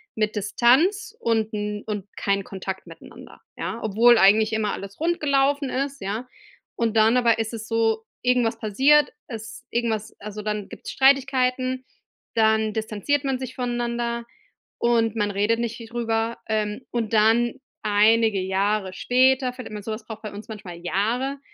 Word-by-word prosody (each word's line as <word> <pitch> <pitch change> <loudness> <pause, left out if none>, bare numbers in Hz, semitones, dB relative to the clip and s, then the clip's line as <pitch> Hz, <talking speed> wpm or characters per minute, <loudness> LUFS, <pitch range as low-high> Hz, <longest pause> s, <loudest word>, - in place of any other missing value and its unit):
mit 215 0 -1
Distanz 275 - +2
und 225 -1 0
'n 210 0 -3
und 205 -3 -4
kein 200 0 0
Kontakt 190 -1 -6
miteinander, 165 0 -13 0.2
ja? 230 - -4
Obwohl 230 +3 +5
eigentlich 215 +2 +5
immer 215 -2 0
alles 200 +4 -8
rund 340 +1 +1
gelaufen 280 -1 +2
ist, 275 +1 -3
ja? 215 +6 -4 0.5
Und 230 -1 -1
dann 220 +3 +5
aber 235 -2 +3
ist 225 +1 -2
es 220 -1 -6
so: 225 -1 +1 0.2
Irgendwas 245 -2 +2
passiert, 275 +8 +4 0.2
es 225 -3 -8
irgendwas 225 -3 -2
also, 210 0 -6
dann 210 -1 -3
gibt's - - -8
Streitigkeiten, 260 -1 +2 0.5
dann 220 -1 +3
distanziert 220 +6 -1
man 270 -1 0
sich 255 -1 -6
voneinander, 240 -1 -2 0.5
und 230 -2 +2
man 205 -1 0
redet 210 +3 +1
nicht 235 -1 -2
viel 230 -1 -10
drüber, 230 -1 -1
ähm, 215 0 -1
und 230 -3 -2
dann, 225 +2 +4 0.3
einige 215 0 +4
Jahre 190 +1 0
später, 255 +4 +2
findet 250 -4 -9
man 210 - -6
sowas 215 +1 -5
braucht 220 0 -8
bei 215 - -5
uns 210 +2 -9
manchmal 200 -5 -8
Jahre, 230 +10 -1
225 Hz, 155 wpm, -24 LUFS, 210-250 Hz, 0.5 s, Obwohl